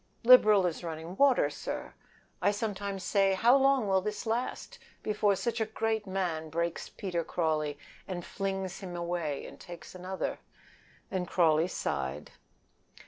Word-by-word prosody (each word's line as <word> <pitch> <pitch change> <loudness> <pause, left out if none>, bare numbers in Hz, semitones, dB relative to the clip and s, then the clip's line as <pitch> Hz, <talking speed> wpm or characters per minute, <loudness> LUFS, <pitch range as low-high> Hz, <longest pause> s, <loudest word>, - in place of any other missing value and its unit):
"Liberal 215 -5 +7
as 175 0 -2
running 165 +1 -6
water, 275 +3 +4
sir. - - -5 0.5
I - - +4
sometimes 200 -2 -3
say 195 -2 +3
how 235 +6 +5
long 270 -4 +4
will 190 -1 +3
this 210 +4 -4
last 230 +3 -3 0.2
before 210 -1 +2
such 230 +3 -2
a 220 - +1
great 220 -1 -1
man 175 -5 -2
breaks 170 +2 -2
Peter 180 -5 -3
Crawley 155 -3 -1 0.3
and 175 -2 -5
flings 195 -1 -3
him 185 -3 -7
away 170 -4 -2
and - - -11
takes 170 -3 -10
another?" 185 +1 -4 0.7
and 185 -2 -2
Crawley 165 -2 +3
sighed. 65 - -3
190 Hz, 140 wpm, -30 LUFS, 170-210 Hz, 0.7 s, Liberal